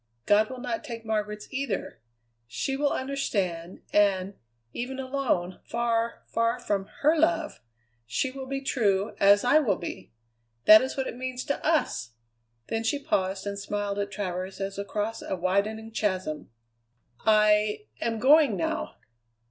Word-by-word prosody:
God 215 +1 +4
will 260 - -6
not 245 -3 -3
take 230 -6 -7
Margaret's 210 -1 -2
either. 260 - -3 0.5
She 270 - -2
will 285 +1 +1
understand, 195 -11 -2
and, 200 -2 +3 0.4
even 260 +2 -4
alone, 260 -10 -1
far, 235 0 -1
far 230 +1 0
from 200 -4 -1 0.2
her 305 +3 +5
love, 325 0 +1 0.5
she 125 - -1
will 265 0 -7
be 270 0 -3
true, 205 -7 +1
as 200 +1 +6
I 270 +5 +5
will 230 -11 +2
be. 175 - -7 0.5
That 215 0 +10
is 260 +1 -3
what 265 - 0
it - - -5
means 255 0 -4
to 280 - -2
us!" 295 - 0 0.5
Then 225 0 -2
she 230 +6 +1
paused 195 - -1
and 200 0 -3
smiled 205 0 -3
at 200 0 -1
Travers 190 -1 -4
as 195 0 -4
across 210 +2 -3
a - - -3
widening 200 +5 -1
chasm. 185 -8 -2 0.7
"I 210 -1 +3 0.2
am 230 0 0
going 270 -2 +5
now!" 170 - -2
215 Hz, 150 wpm, -27 LUFS, 200-260 Hz, 0.7 s, That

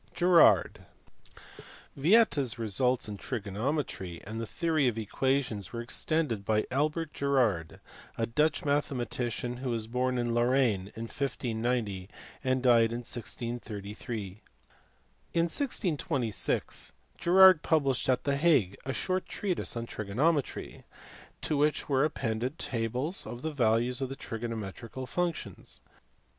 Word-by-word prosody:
Girard. 175 -1 +4 1.1
Yieta 175 +3 +4
s 125 -5 -2
results 120 +3 0
in 105 -1 -6
trigonometry 105 - -3
and 110 +3 -5
the 115 - -4
theory 160 -2 +1
of 115 -2 0
equations 115 -2 -1
were 115 - -5
extended 120 -1 -1
by 110 +1 +1
Albert 155 +4 0
Girard, 120 - 0 0.4
a 115 - +1
Dutch 150 +9 +1
mathe 145 -1 +1
matician, 120 -1 -3
who 130 0 -3
was 115 -2 -1
born 125 +2 -1
in 120 -1 0
Lorraine 120 -5 +2
in 115 - -5
1590 115 -6 -2 0.3
and 130 -1 +1
died 115 -2 +5
in 120 +1 -3
1633. 110 -3 -5 0.9
In 165 - +4
1626 165 - 0 0.3
Girard 185 -1 +7
published 140 -6 +1
at 130 - +2
the 140 -1 +1
Hague 140 - +3
a 130 - -3
short 185 +5 -1
treatise 180 - -2
on 115 - -3
trigonometry, 130 +9 -1 0.6
to 155 - 0
which 150 +1 +1
were 135 -1 +2
appended 125 -1 -2
tables 125 - -1
of 120 +1 -7
the 160 -1 -2
values 120 0 +2
of 135 - -2
the 135 - -5
trigonometrical 115 +1 -6
functions. 125 - -4
125 Hz, 125 wpm, -30 LUFS, 115-145 Hz, 1.1 s, Girard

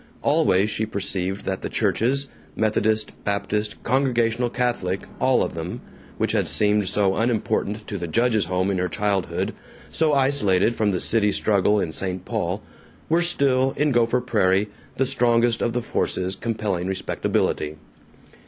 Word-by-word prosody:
Always 100 +4 +3
she 110 +1 -2
perceived 95 -2 -2
that 95 0 -2
the - - -4
churches 135 +4 +1 0.3
Methodist, 110 0 +1
Baptist, 105 +1 -2
Congregational, 120 -2 +1
Catholic, 120 -7 -1 0.2
all - - +3
of - - -3
them - - -5 0.4
which - - 0
had - - +1
seemed 105 -2 +2
so 100 -1 +1
unimportant 110 -2 -1
to 100 - -4
the 85 - -4
judge's 115 +3 +2
home 95 +1 0
in 95 - -1
her 90 0 -1
childhood, 100 0 -1 0.4
so 155 -2 +2
isolated 120 -7 +2
from 110 -2 +1
the 95 -3 0
city 105 -2 +2
struggle 105 0 +2
in 80 - -2
St. 95 +2 -3
Paul, - - -2 0.5
were 165 +2 +3
still, 135 -6 +3
in 150 0 +2
Gopher 120 0 +2
Prairie, 105 -4 +1 0.3
the 135 - +2
strongest 120 -3 +2
of 120 - 0
the 125 - -1
forces 95 -4 -1
compelling 105 -5 -2
respectability. 80 -4 -1
105 Hz, 150 wpm, -23 LUFS, 95-120 Hz, 0.5 s, Always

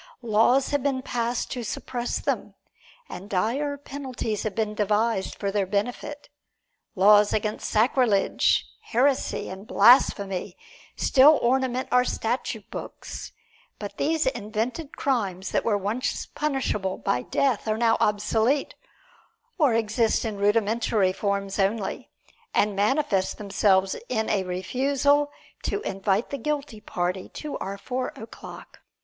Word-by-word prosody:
Laws 235 +4 +3
have 285 -1 +1
been 265 -1 -1
passed 240 -1 -2
to 245 -2 -3
suppress 240 +2 -3
them, - - -3 0.5
and 195 +3 -9
dire 265 +10 0
penalties 260 -6 -4
have 215 -3 -3
been 215 -1 -1
devised 210 -1 0
for 200 -1 -2
their 200 -2 0
benefit. 245 +8 -3 0.7
Laws 205 +2 +6
against 215 0 -2
sacrilege, 220 -2 +2 0.2
heresy 260 +3 +1
and 190 +3 -8
blasphemy 200 -5 +4 0.4
still 285 +3 +6
ornament 255 +1 +1
our 250 0 +5
statute 225 -3 -3
books; - - -7 0.5
but 205 -1 -7
these 320 +2 +1
invented 245 +5 -3
crimes 195 -9 -1
that - - +1
were 210 -3 +2
once 225 +8 -2
punishable 265 -10 -2
by 125 - 0
death 255 - 0
are 215 0 +1
now 230 -1 +3
obsolete, 220 +6 +1 0.9
or 280 -7 +4
exist 225 +1 +1
in 215 -2 -3
rudimentary 210 -1 +2
forms 200 0 -2
only, 200 +1 -1 0.5
and 205 -1 +2
manifest 205 -2 +1
themselves 195 -2 +2
in 220 -3 0
a 205 - +2
refusal 275 +10 +1 0.3
to - - -2
invite 195 - -1
the 280 - -3
guilty 285 -4 -3
party 180 0 -3
to 300 -1 -6
our 195 +1 -4
Four 250 +5 -3
o'Clock. 220 +1 -11
220 Hz, 125 wpm, -25 LUFS, 200-260 Hz, 0.9 s, Laws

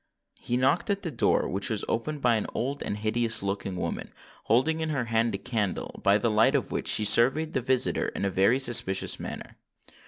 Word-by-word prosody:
He 120 - -2
knocked 135 - +1
at 200 0 -1
the 165 - -4
door, 120 - +1
which 100 +6 -1
was 110 -3 -2
opened 145 +6 -3
by 120 -1 +4
an 110 - -1
old 140 +4 -3
and 105 - -4
hideous 110 +1 +1
looking 100 -1 -3
woman, 90 - -5 0.3
holding 130 +9 +1
in 160 -1 -2
her 140 -5 -2
hand 115 -1 0
a - - -2
candle, 105 -4 -3
by 100 +1 +4
the 110 +2 -1
light 110 +6 +3
of 135 - -1
which - - -3
she 105 - +4
surveyed 135 +9 +4
the 130 - -1
visitor 130 +1 +1
in - - -4
a 100 - -1
very 100 +7 +3
suspicions 120 -7 +1
manner. - - -8
115 Hz, 210 wpm, -26 LUFS, 105-130 Hz, 0.3 s, by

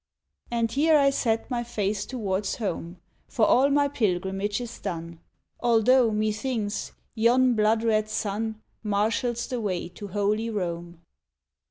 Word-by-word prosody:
And 230 -1 0
here 305 +5 +4
I 275 -1 +4
set 230 -2 -1
my 240 -1 0
face 205 -3 -2
towards 200 -5 -2
home, 180 -5 -4 0.3
For 220 - +2
all 265 +5 +4
my 285 0 +3
pilgrimage 200 -4 -1
is 240 -1 -7
done, 170 -3 -5 0.4
Although, 240 +1 +4
methinks, 215 0 -2 0.2
yon 245 +2 +4
blood 220 0 +2
red 215 -2 +1
sun 215 +1 -2 0.2
Marshals 225 +3 0
the 250 -2 -3
way 185 -5 -2
to 190 +3 -9
Holy 210 +3 0
Rome. 175 -4 -4
215 Hz, 135 wpm, -26 LUFS, 200-240 Hz, 0.4 s, here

